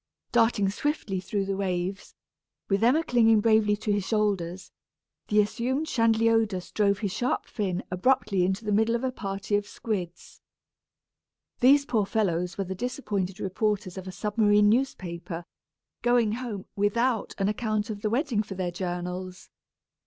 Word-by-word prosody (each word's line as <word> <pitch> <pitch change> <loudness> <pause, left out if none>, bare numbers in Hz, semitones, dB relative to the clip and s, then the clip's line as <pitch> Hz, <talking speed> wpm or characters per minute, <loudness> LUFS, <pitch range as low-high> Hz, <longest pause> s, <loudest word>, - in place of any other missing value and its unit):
Darting 225 -4 +3
swiftly 215 -6 -2
through 200 +1 -2
the 195 0 -2
waves, 190 0 -3 0.5
with 200 +2 +1
Emma 275 +8 +4
clinging 225 -5 +4
bravely 215 -1 +3
to 210 0 -2
his 205 -1 +1
shoulders, 190 -4 -1 0.6
the 210 - +3
assumed 245 +8 0
Chanliodus 225 - +2
drove 200 -2 +2
his 200 -3 -2
sharp 245 +6 -1
fin 190 -4 -3
abruptly 195 -1 +2
into 190 +4 -1
the 210 - -1
middle 220 +3 +3
of 235 - -2
a 260 - 0
party 195 -3 -3
of 205 0 -1
squids. 185 -8 -5 1.2
These 280 +3 +5
poor 220 -7 0
fellows 180 -4 0
were 195 - 0
the 190 0 -5
disappointed 205 -5 -3
reporters 200 0 -1
of 190 -1 -7
a - - -5
submarine 210 0 +3
newspaper, 175 -8 -2 0.6
going 240 -3 +3
home 225 -4 -5
without 225 +4 0
an 195 - +1
account 215 0 -1
of 205 -1 -6
the 215 - 0
wedding 240 -2 +1
for 205 -2 -7
their 180 -1 -2
journals! 180 +1 -5
205 Hz, 150 wpm, -27 LUFS, 190-230 Hz, 1.2 s, These